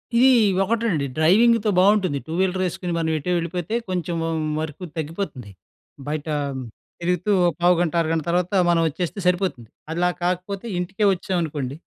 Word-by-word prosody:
ఇది 245 Hz, +3 st, +6 dB, 0.4 s
ఒకటండి 215 Hz, -8 st, 0 dB
డ్రైవింగ్‌తో 215 Hz, +7 st, +4 dB
బావుంటుంది 190 Hz, -6 st, +3 dB
టూ 160 Hz, -, -5 dB
వీలర్ 185 Hz, 0 st, +1 dB
ఏసుకొని 175 Hz, 0 st, -4 dB
మనం 165 Hz, -1 st, 0 dB
ఎటో 165 Hz, +4 st, -3 dB
వెళ్ళిపోతే 175 Hz, +4 st, -3 dB
కొంచెం 175 Hz, -2 st, -2 dB
వ -, -, -1 dB, 0.3 s
వరకు 155 Hz, +2 st, -5 dB
తగ్గిపోతుంది. 155 Hz, -, -5 dB, 0.6 s
బయట 150 Hz, +1 st, -3 dB, 0.7 s
తిరుగుతూ 180 Hz, +3 st, 0 dB
ఒక 175 Hz, -, +3 dB
పావుగంట 175 Hz, -1 st, +3 dB
అరగంట 160 Hz, -1 st, -1 dB
తర్వాత 180 Hz, +2 st, 0 dB, 0.2 s
మనం 170 Hz, -1 st, +3 dB
వచ్చేస్తే 175 Hz, +5 st, -4 dB
సరిపోతుంది. 180 Hz, -, 0 dB, 0.2 s
అలా 175 Hz, +2 st, +1 dB
కాకపోతే 185 Hz, +3 st, -2 dB
ఇంటికే 190 Hz, +4 st, -1 dB
వచ్చామనుకోండి 160 Hz, -8 st, -3 dB
175 Hz, 135 wpm, -23 LUFS, 160-190 Hz, 0.7 s, ఇది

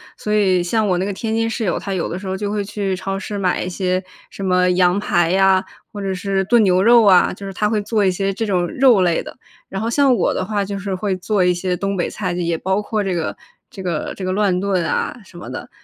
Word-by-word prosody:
所 210 Hz, -, -3 dB
以 190 Hz, -4 st, +3 dB
像 215 Hz, +4 st, 0 dB
我 185 Hz, -2 st, +1 dB
那 185 Hz, -, -1 dB
个 205 Hz, -, -2 dB
天 220 Hz, +3 st, -3 dB
津 225 Hz, 0 st, 0 dB
室 225 Hz, 0 st, -3 dB
友， 185 Hz, -, 0 dB
他 195 Hz, -, -4 dB
有 185 Hz, -, -1 dB
的 175 Hz, -, -4 dB
时 190 Hz, -, -9 dB
候 190 Hz, 0 st, -3 dB
就 205 Hz, +1 st, -3 dB
会 205 Hz, -1 st, -1 dB
去 200 Hz, -1 st, -3 dB
超 195 Hz, +1 st, -4 dB
市 205 Hz, +1 st, -5 dB
买 185 Hz, -3 st, 0 dB
一 -, -, -3 dB
些 185 Hz, 0 st, -1 dB, 0.3 s
什 195 Hz, -, -8 dB
么 180 Hz, -1 st, +3 dB
羊 180 Hz, 0 st, +3 dB
排 175 Hz, -4 st, +1 dB
呀， 190 Hz, 0 st, +4 dB, 0.3 s
或 205 Hz, -, -7 dB
者 195 Hz, -1 st, -2 dB
是 195 Hz, +1 st, -1 dB
炖 235 Hz, +2 st, +4 dB
牛 185 Hz, -2 st, +3 dB
肉 235 Hz, +3 st, +6 dB
啊， 190 Hz, -3 st, +5 dB
就 195 Hz, +2 st, -9 dB
是 195 Hz, -, -5 dB
他 210 Hz, +3 st, 0 dB
会 215 Hz, -1 st, 0 dB
做 210 Hz, 0 st, 0 dB
一 190 Hz, -, +3 dB
些 195 Hz, +2 st, -1 dB
这 225 Hz, -, -2 dB
种 185 Hz, -4 st, +1 dB
肉 250 Hz, -2 st, +4 dB
类 175 Hz, -2 st, +2 dB
的。 -, -, -10 dB, 0.3 s
然 195 Hz, -, -5 dB
后 225 Hz, -, -1 dB
像 270 Hz, +1 st, +3 dB
我 -, -, +1 dB
的 -, -, -2 dB
话， 205 Hz, 0 st, -1 dB
就 200 Hz, 0 st, -4 dB
是 195 Hz, -1 st, -3 dB
会 190 Hz, 0 st, -2 dB
做 190 Hz, +1 st, 0 dB
一 180 Hz, 0 st, +3 dB
些 180 Hz, +1 st, -2 dB
东 195 Hz, +2 st, -2 dB
北 175 Hz, -, -1 dB
菜， 185 Hz, -4 st, -3 dB
就 175 Hz, -, -3 dB
也 170 Hz, -1 st, -1 dB
包 190 Hz, +4 st, 0 dB
括 210 Hz, 0 st, -2 dB
这 190 Hz, -2 st, -1 dB
个， 165 Hz, -2 st, -2 dB, 0.3 s
这 190 Hz, -, -9 dB
个， 170 Hz, -4 st, -3 dB
这 195 Hz, -, -7 dB
个 185 Hz, -, -1 dB
乱 195 Hz, -2 st, +1 dB
炖 190 Hz, -3 st, 0 dB
啊 -, -, -1 dB
什 175 Hz, -, -15 dB
么 175 Hz, -, -8 dB
的。 -, -, -7 dB
195 Hz, 295 characters per minute, -19 LUFS, 180-205 Hz, 0.3 s, 肉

